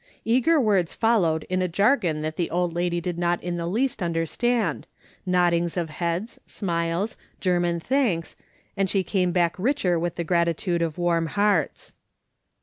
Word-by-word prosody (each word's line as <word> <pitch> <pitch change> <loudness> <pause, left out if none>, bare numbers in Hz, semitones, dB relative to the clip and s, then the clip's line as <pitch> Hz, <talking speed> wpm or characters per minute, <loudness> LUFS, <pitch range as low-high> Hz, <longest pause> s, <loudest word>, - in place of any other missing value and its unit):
Eager 260 +8 +3
words 200 - +1
followed 180 -9 +2
in 185 0 -1
a 185 - +1
jargon 180 - +2
that 155 0 -3
the 175 - -1
old 175 -1 0
lady 175 0 0
did 175 0 -4
not 175 0 +1
in 175 0 -3
the 170 0 -3
least 235 +5 -1
understand, 175 +4 0 0.4
noddings 175 -1 +2
of 165 -3 -2
heads, 170 +7 -3
smiles, 170 +2 -2 0.2
German 175 -2 +1
thanks, 220 - 0 0.4
and 195 -2 0
she 195 0 +1
came 185 -2 0
back 175 -1 +2
richer 190 - +1
with 175 0 -2
the 170 - -2
gratitude 170 +1 0
of 165 -2 -2
warm 170 -2 +1
hearts. 205 0 0
175 Hz, 155 wpm, -24 LUFS, 170-200 Hz, 0.4 s, Eager